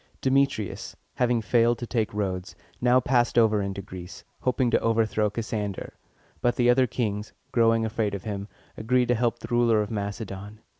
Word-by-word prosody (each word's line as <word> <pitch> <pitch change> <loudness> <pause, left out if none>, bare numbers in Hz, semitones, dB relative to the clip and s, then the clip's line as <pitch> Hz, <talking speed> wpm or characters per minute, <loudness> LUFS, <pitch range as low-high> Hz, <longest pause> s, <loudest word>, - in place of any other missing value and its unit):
Demetrius, 130 -6 0 0.2
having 120 -2 +1
failed 120 +1 +3
to 120 - -5
take 115 -3 -1
Rhodes, 95 -3 -3 0.3
now 125 +1 +5
passed 125 -1 +1
over 110 -3 +4
into 100 0 -4
Greece, 90 -1 -9 0.2
hoping 125 -1 +1
to - - +4
overthrow 110 -2 +1
Cassander; 105 -2 -4 0.5
but 120 - +2
the 120 0 +4
other 130 +1 +3
kings, 105 -3 -3 0.2
growing 115 -2 +3
afraid 110 -2 -1
of 95 - -7
him, 100 -2 -4 0.3
agreed 125 +2 +1
to - - +5
help 120 0 0
the 115 - -10
ruler 120 -2 +4
of 105 - -7
Macedon. 100 0 -5
115 Hz, 165 wpm, -26 LUFS, 105-120 Hz, 0.5 s, now